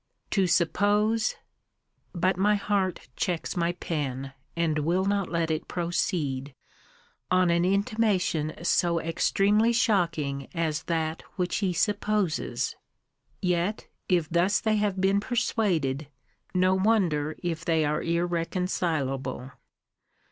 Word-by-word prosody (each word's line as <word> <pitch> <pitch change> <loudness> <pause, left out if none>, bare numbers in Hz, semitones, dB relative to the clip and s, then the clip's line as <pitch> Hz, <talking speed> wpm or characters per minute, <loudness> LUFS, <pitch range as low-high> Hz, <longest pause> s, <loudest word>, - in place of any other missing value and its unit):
to 195 -3 +2
suppose 205 +6 +2 0.8
but 185 +1 +1
my 205 +3 +3
heart 200 -3 -1
checks 175 -3 -2
my 170 -1 +1
pen, 135 -6 -4 0.2
and 165 -2 +1
will 175 +5 +1
not 200 -1 0
let 165 -1 0
it 155 - -2
proceed, 150 -6 -2 0.7
on 185 -1 +3
an 170 0 +2
intimation 195 -5 +1
so 170 -1 +2
extremely 200 +7 +2
shocking 165 - +1
as 160 -2 -1
that 160 -1 -1
which 180 -1 -1
he 195 -3 0
supposes! 205 -1 0 0.7
Yet, 180 +3 0 0.2
if 175 -4 +2
thus 175 +5 +2
they 215 -1 +1
have 205 -2 0
been 195 +1 +3
persuaded, 185 - 0 0.5
no 185 +1 +4
wonder 185 -7 +1
if 170 -1 -2
they 160 -3 +2
are 150 +1 0
irreconcilable. 165 -6 -1
175 Hz, 110 wpm, -27 LUFS, 160-200 Hz, 0.8 s, no